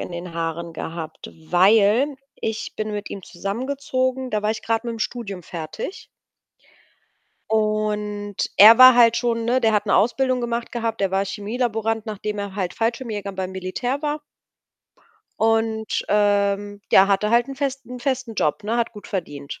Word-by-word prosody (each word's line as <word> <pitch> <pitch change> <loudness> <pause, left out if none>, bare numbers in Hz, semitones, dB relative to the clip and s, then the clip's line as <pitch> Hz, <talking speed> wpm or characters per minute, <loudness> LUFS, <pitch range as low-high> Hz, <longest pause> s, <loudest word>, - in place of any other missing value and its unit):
in - - -6
den 175 0 -7
Haaren 165 0 -3
gehabt, 160 0 -7 0.2
weil 215 +9 +4 0.2
ich 220 0 -4
bin 215 0 -3
mit 205 0 -5
ihm 195 - -7
zusammengezogen, 255 +6 -3
da 210 -2 -1
war 210 - +1
ich 220 - -4
grad 225 0 0
mit'm 235 -2 -5
Studium 205 -6 -4
fertig. 160 - -7 1.4
Und 210 -1 -1 0.2
er 220 +3 +9
war 255 0 +10
halt 235 -1 +6
schon, 235 -1 0
ne 245 +3 +2
der 225 -2 +3
hat 210 0 +1
'ne - - +2
Ausbildung 255 +3 +2
gemacht 235 0 -3
gehabt. 230 -2 -3
Der 195 -1 +1
war 195 +1 +1
Chemielaborant, 225 +2 -2
nachdem 210 0 -4
er 200 -1 -5
halt 185 -3 -3
Fallschirmjäger 225 -3 -2
beim 190 -1 -4
Militär 215 +9 -3
war. 300 0 -2 1.2
Und, 225 -1 +1
ähm, 205 0 +1
ja, 190 +1 +6
hatte 200 +2 +2
halt 235 +2 +3
'n 275 - -7
festen 270 -3 -4
'n - - -10
festen 260 -3 -2
Job, 170 +1 0
ne, 225 +3 -1
hat 235 -1 0
gut 210 -2 -11
verdient. 145 -7 -5
215 Hz, 160 wpm, -22 LUFS, 200-235 Hz, 1.4 s, war